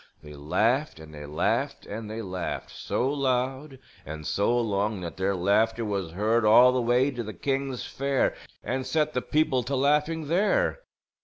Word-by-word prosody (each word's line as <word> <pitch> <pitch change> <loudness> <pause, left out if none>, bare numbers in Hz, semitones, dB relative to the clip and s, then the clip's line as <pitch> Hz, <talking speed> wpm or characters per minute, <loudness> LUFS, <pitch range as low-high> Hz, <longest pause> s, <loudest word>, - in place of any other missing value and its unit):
They 75 0 -10
laughed 105 - 0
and 80 -1 -12
they 75 -1 -8
laughed 75 +1 -1
and 110 +1 -6
they 110 +1 -5
laughed, 90 -2 -5
so 125 - -2
loud 135 0 -1 0.3
and 75 +1 -8
so 120 +8 +1
long 105 -2 -1
that 85 -1 -6
their 95 +1 0
laughter 110 +5 +1
was 100 -6 -3
heard 110 +5 +1
all 120 +4 +7
the 125 0 0
way 125 +4 +2
to 120 -2 -5
the 110 -1 -6
king's 135 -2 -2
fair 140 0 0 0.3
and 130 +1 -2
set 155 +2 0
the 125 - 0
people 150 -4 +1
to 130 +4 -3
laughing 150 +4 +1
there. 210 - +1
120 Hz, 170 wpm, -26 LUFS, 100-135 Hz, 0.3 s, all